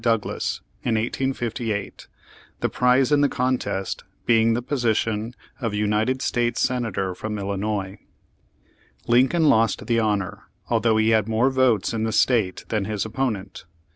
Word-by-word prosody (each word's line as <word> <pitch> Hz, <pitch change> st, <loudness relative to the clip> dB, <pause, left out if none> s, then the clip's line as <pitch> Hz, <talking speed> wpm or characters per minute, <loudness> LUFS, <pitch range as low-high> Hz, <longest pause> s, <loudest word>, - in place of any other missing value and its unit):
Douglas 115 Hz, -3 st, -1 dB, 0.2 s
in 115 Hz, -, 0 dB
1858, 115 Hz, -2 st, -2 dB, 0.5 s
the -, -, 0 dB
prize 125 Hz, +1 st, +3 dB
in 145 Hz, -1 st, +4 dB
the 145 Hz, -, +3 dB
contest 125 Hz, -6 st, -2 dB, 0.2 s
being 115 Hz, -1 st, +4 dB
the 120 Hz, -, -2 dB
position 115 Hz, -3 st, -1 dB, 0.2 s
of 115 Hz, -6 st, -2 dB
United 105 Hz, +5 st, 0 dB
States 120 Hz, -1 st, 0 dB
Senator 115 Hz, -7 st, -1 dB
from 105 Hz, +4 st, -5 dB
Illinois. 100 Hz, 0 st, -3 dB, 1.1 s
Lincoln 130 Hz, +7 st, +3 dB
lost 115 Hz, -5 st, +3 dB
the 115 Hz, 0 st, +2 dB
honor, 105 Hz, -4 st, -1 dB, 0.2 s
although 115 Hz, -1 st, +2 dB
he 110 Hz, 0 st, +3 dB
had 110 Hz, -1 st, +2 dB
more 115 Hz, +4 st, +2 dB
votes 125 Hz, -7 st, +2 dB
in 110 Hz, -, -2 dB
the 110 Hz, -, 0 dB
state 110 Hz, -4 st, +1 dB
than 105 Hz, -3 st, 0 dB
his 105 Hz, 0 st, -2 dB
opponent. 110 Hz, -4 st, -3 dB
115 Hz, 140 wpm, -23 LUFS, 105-125 Hz, 1.1 s, in